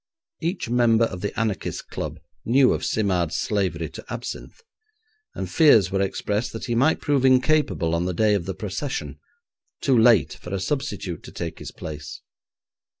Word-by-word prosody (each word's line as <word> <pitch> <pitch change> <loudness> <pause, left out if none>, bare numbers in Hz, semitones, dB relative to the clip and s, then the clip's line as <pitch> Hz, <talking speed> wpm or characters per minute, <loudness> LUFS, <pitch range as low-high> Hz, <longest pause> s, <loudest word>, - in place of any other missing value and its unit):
Each 170 -1 -2
member 115 -1 +4
of 90 -5 -6
the 105 +4 -3
anarchists' 110 -6 -2
club - - -6 0.2
knew 130 +2 +4
of - - -3
Simard's 90 -6 0
slavery 90 -6 -1
to - - -10
absinthe, - - -6 0.8
and - - -3
fears 145 - +5
were 95 0 +1
expressed 105 +3 -1
that 115 - -5
he 120 - -2
might 135 +7 +2
prove 145 -3 +1
incapable 130 - +3
on 85 +1 0
the 90 - -1
day 105 +2 +3
of 100 -5 0
the 95 - -4
procession, 105 +7 -4 0.6
too 135 - +2
late 115 -3 +5
for 90 +1 -6
a - - -2
substitute 100 - -3
to - - -11
take - - -5
his - - -7
place. 75 -1 -8
110 Hz, 165 wpm, -24 LUFS, 90-130 Hz, 0.8 s, fears